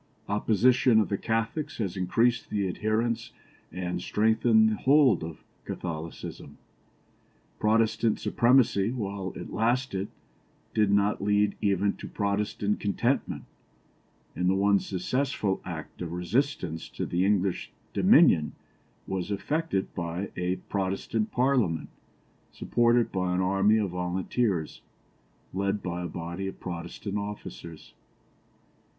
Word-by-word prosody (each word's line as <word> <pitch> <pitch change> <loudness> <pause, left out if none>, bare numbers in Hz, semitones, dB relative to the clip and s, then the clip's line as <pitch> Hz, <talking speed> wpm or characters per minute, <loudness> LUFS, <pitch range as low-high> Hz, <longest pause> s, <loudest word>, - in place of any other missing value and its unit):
Oppression 115 +3 +4
of 110 - +1
the 100 - 0
Catholics 115 +7 -2
has 100 -5 -2
increased 115 +6 +1
the 100 -2 0
adherents 110 +5 -1 0.4
and 90 0 -3
strengthened 110 +2 +3
the - - 0
hold 135 - +4
of 80 -1 -8 0.2
Catholicism. 80 -3 -6 1.0
Protestant 110 0 +2
supremacy, 120 -5 +3
while 100 -6 -4
it - - -7
lasted, 115 -4 0 0.7
did 105 -2 +3
not 100 0 +2
lead 105 0 +2
even 100 0 +2
to - - -8
Protestant 100 0 -1
contentment, 120 +6 -1 0.9
and 90 +2 +1
the 95 - +3
one 100 +1 +4
successful 100 +1 -1
act 85 -2 -7
of 85 -1 -4
resistance 90 - -1
to - - -4
the 90 +1 0
English 95 -2 +1 0.2
dominion 75 -1 +5 0.5
was 95 0 -3
effected 125 0 -1
by 85 +2 -4
a 90 +1 -1
Protestant 100 +3 -1
Parliament 125 - +1 0.6
supported 120 -1 +2
by 90 -1 0
an 90 - +1
army 95 +3 +3
of 100 -4 0
volunteers, 90 0 -1 0.7
led 100 +2 -1
by 90 -1 -3
a 90 - -3
body 85 +3 -5
of 95 - -7
Protestant 95 +3 -5
officers. 85 -6 -8
100 Hz, 115 wpm, -28 LUFS, 90-115 Hz, 1.0 s, dominion